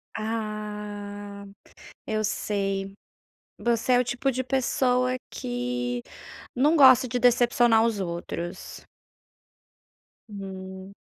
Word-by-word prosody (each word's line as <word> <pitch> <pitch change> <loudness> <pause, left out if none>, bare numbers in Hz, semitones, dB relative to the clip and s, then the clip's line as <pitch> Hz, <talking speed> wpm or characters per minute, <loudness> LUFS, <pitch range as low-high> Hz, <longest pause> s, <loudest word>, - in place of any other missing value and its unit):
Ah, 210 -2 -5 0.6
eu 215 0 -1
sei. 195 -2 -2 0.6
Você 235 +1 +1
é 245 - +6
o 250 - +2
tipo 245 +3 -1
de 260 0 -2
pessoa 255 -1 +1
que 120 0 -3 0.5
não 290 +6 +3
gosta 260 -3 +7
de 245 - -1
decepcionar 240 -2 +4
os 225 -3 0
outros. 170 -1 -5 1.5
Hum. 190 -1 -8
215 Hz, 90 wpm, -26 LUFS, 195-245 Hz, 1.5 s, gosta